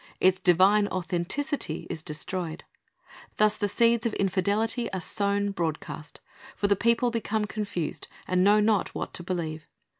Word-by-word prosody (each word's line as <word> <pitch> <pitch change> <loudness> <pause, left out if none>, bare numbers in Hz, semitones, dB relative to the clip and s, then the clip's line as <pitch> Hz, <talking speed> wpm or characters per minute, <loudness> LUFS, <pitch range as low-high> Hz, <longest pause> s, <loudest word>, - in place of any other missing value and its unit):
Its 185 0 +4
divine 195 +4 +5
authenticity 185 - -2
is 165 -3 -4
destroyed. 160 +2 -4 0.7
Thus 215 0 +4
the 205 - -1
seeds 230 +2 +3
of 225 - -4
infidelity 205 +5 0
are 190 - -1
sown 200 +2 0
broadcast; 160 -3 -5 0.3
for - - -2
the 200 0 +4
people 235 +3 +2
become 220 -2 -1
confused, 200 -6 -4 0.2
and 185 0 +2
know 205 +2 +5
not 210 -2 +1
what - - -4
to 175 - -3
believe. 160 -4 -4
200 Hz, 145 wpm, -27 LUFS, 175-215 Hz, 0.7 s, divine